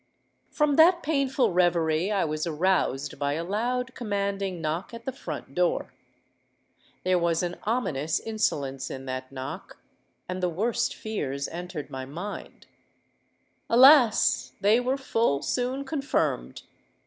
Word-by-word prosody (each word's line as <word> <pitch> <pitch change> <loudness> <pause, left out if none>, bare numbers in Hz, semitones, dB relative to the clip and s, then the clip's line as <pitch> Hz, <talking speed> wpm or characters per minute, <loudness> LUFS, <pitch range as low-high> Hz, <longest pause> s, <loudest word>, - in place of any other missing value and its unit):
"From 300 -2 +1
that 345 +2 +6
painful 275 -5 +1
reverie 170 0 +2
I 200 -2 +1
was 155 +1 -2
aroused 155 -5 0
by 145 0 0
a 165 +3 -2
loud 245 +7 -2
commanding 200 -5 -2
knock 165 +8 -3
at 230 0 -11
the 265 - -2
front 265 - -7
door. - - 0 1.1
There 185 -1 +2
was 170 0 +1
an 175 0 -3
ominous 165 - 0
insolence 145 -12 -2
in 135 0 -7
that 130 0 -5
knock; 130 -1 -7 0.5
and 185 0 -4
the 180 - +1
worst 230 +7 -1
fears 140 - -3
entered 175 -3 -6
my 130 0 -5
mind. 175 +10 -7 1.0
Alas! 255 -1 +6
they 205 +4 +4
were 255 +2 0
full 225 - 0
soon 255 +2 -1
confirmed. 280 -1 -1
195 Hz, 130 wpm, -27 LUFS, 155-245 Hz, 1.1 s, that